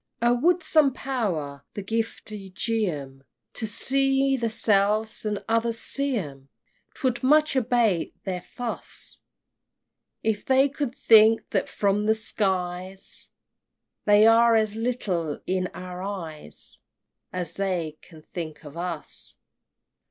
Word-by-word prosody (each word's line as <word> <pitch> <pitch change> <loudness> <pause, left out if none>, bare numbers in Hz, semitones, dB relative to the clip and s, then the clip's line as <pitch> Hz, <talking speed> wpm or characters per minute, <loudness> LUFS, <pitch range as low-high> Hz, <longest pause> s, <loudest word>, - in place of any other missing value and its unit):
XXXIII. 235 - +5
"Oh - - +5
would 350 +5 +3
some 305 -4 +4
Power 170 - -3
the 205 - -4
giftie 215 -2 -4
gie 220 +1 0
'em, 135 -3 -7 0.3
To 220 - -2
see 270 +4 +2
themselves 215 -2 +2
as 210 -1 -1
others 230 0 +1
see 275 +1 0
'em," 140 -7 -7 0.5
'Twould 255 -4 -1
much 300 +3 +4
abate 230 -8 +1
their 185 -2 -3
fuss! 240 +5 -7 1.0
If 220 -2 0
they 265 +1 +4
could 275 -2 -3
think 225 0 +6
that - - 0
from 205 +1 0
the 220 - +5
iskies 190 -3 0 0.8
They 210 +1 +6
are 230 +1 +6
as 215 -1 +1
little 200 -10 -2
in 185 0 0
our 180 0 -7
eyes 165 - -3 0.5
As 180 -1 -4
they 175 -6 -2
can 160 -3 -16
think 155 -3 -7
of 145 +1 -10
us! 170 -2 -4
210 Hz, 125 wpm, -25 LUFS, 180-235 Hz, 1.0 s, think